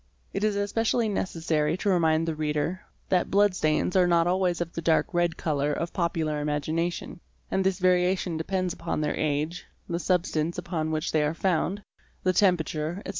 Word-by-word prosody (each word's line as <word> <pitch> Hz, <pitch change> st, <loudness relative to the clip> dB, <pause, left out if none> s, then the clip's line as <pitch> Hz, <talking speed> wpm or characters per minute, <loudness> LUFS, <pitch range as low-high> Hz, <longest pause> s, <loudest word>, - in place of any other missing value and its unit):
It 200 Hz, -, -2 dB
is 215 Hz, -1 st, +2 dB
especially 220 Hz, +3 st, +1 dB
necessary 165 Hz, -5 st, 0 dB
to 205 Hz, -, -4 dB
remind 165 Hz, -3 st, +2 dB
the 165 Hz, -, 0 dB
reader 155 Hz, +4 st, -2 dB
(see -, -, -33 dB
p. -, -, +3 dB
189) -, -, +4 dB
that -, -, -5 dB
blood 205 Hz, -1 st, +3 dB
stains 155 Hz, +2 st, +1 dB
are 180 Hz, -1 st, +5 dB
not 170 Hz, -1 st, +3 dB
always 180 Hz, -1 st, +1 dB
of 170 Hz, -1 st, -3 dB
the 165 Hz, -, -4 dB
dark 165 Hz, +3 st, +2 dB
red 175 Hz, -1 st, +1 dB
colour 145 Hz, -2 st, 0 dB
of 170 Hz, +3 st, -3 dB
popular 160 Hz, -4 st, -1 dB
imagination, 155 Hz, +4 st, -2 dB, 0.3 s
and 190 Hz, -, +1 dB
this 190 Hz, -1 st, +1 dB
variation 180 Hz, -1 st, +2 dB
depends 185 Hz, +2 st, -1 dB
upon 165 Hz, -, -3 dB
their 150 Hz, -, -1 dB
age, 155 Hz, +3 st, -2 dB, 0.2 s
the 170 Hz, 0 st, -2 dB
substance 170 Hz, -2 st, 0 dB
upon 170 Hz, -3 st, -2 dB
which 155 Hz, 0 st, -1 dB
they 155 Hz, -, +2 dB
are 150 Hz, +2 st, 0 dB
found, 190 Hz, +2 st, 0 dB, 0.4 s
the 185 Hz, -, +2 dB
temperature, 175 Hz, -2 st, +1 dB
etc. -, -, -6 dB
170 Hz, 190 wpm, -27 LUFS, 155-185 Hz, 0.4 s, are